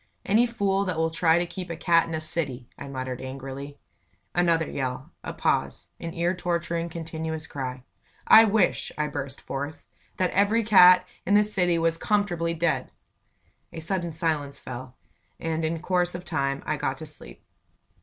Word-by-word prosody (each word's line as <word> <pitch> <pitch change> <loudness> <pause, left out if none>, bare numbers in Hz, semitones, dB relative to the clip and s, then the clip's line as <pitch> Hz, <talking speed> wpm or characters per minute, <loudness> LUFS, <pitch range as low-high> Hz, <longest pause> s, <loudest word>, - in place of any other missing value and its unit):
"Any 225 +5 +4
fool 200 -4 0
that 180 -4 -2
will 160 0 +1
try 165 0 +3
to 175 - +1
keep 180 +1 -7
a 165 - -3
cat 170 0 +3
in 165 - -3
a - - -2
city!" 145 -6 -2
I 140 - -8
muttered, 130 -2 -5
angrily. 135 +2 -7 0.6
Another 170 -3 +2
yell 130 -1 -4
a - - -4
pause - - -1
an 165 0 -6
ear 170 +2 +1
torturing, 170 -1 -2
continuous 160 -1 -4
cry. 130 -2 -5 0.4
"I 225 - +9
wish," 215 -3 +2
I 150 - +1
burst 140 -2 -5
forth, 145 +3 -5 0.3
"that 185 -1 +1
every 205 +4 +3
cat 180 -3 +7 0.2
in 200 - +2
the 210 - +6
city 180 -5 +2
was 165 0 +1
comfortably 175 -5 0
dead!" 165 0 0 0.8
A - - -7
sudden 170 +1 -2
silence 155 -3 -2
fell, 125 +1 -8 0.4
and 165 0 -2
in 160 +1 -1
course 180 -1 +1
of 175 - -7
time 140 -4 -1
I 155 - -1
got 135 -1 -2
to 155 - -7
sleep. 145 - -11
165 Hz, 170 wpm, -26 LUFS, 145-180 Hz, 0.8 s, I